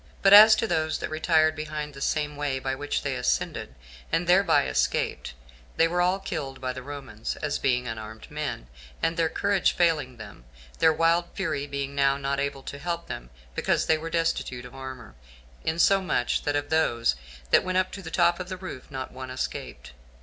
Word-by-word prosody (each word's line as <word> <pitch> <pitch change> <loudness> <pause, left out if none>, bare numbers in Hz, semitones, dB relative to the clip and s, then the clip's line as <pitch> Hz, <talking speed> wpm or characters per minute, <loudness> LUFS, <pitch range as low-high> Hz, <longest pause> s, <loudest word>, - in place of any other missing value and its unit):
But 195 0 +7
as 215 +1 +11
to 220 - 0
those 160 -5 0
that - - -5
retired 155 0 +3
behind 150 -1 -5
the 140 - -10
same 150 0 -1
way 145 -2 -1
by 130 0 -2
which 145 +2 -2
they - - -1
ascended, 60 0 -1 0.4
and 165 +2 +1
thereby 180 - +4
escaped, 65 -1 -1 0.4
they 165 - +5
were 175 +1 0
all 180 +2 +2
killed 155 -9 -5
by 130 -1 -3
the 130 - -7
Romans, 135 -6 -6
as 145 -1 -1
being 125 -2 +1
unarmed 110 +1 -7
men, 150 - -4 0.4
and 165 +1 +1
their 165 -1 +1
courage 200 +3 +1
failing 150 -8 +1
them; 105 - -11 0.3
their 160 - +6
wild 165 +2 +2
fury 145 -7 -2
being 140 0 -4
now 140 0 +2
not 140 0 -2
able 140 -1 -3
to 140 - -7
help 170 +1 -3
them, - - -7 0.2
because - - +1
they 160 -1 +2
were 165 +1 -5
destitute 165 -7 -1
of 125 - -11
armor, 130 - -8 0.5
insomuch 175 -4 +2
that 145 - 0
of 145 0 -2
those 120 - +2 0.4
that - - +6
went 185 0 -1
up 185 0 +1
to 200 - -7
the 170 - -7
top 175 0 +3
of 185 0 -6
the 185 - -4
roof, 185 -9 -8
not 130 -2 -6
one 130 0 -8
escaped. 130 - -5
150 Hz, 195 wpm, -26 LUFS, 130-170 Hz, 0.5 s, as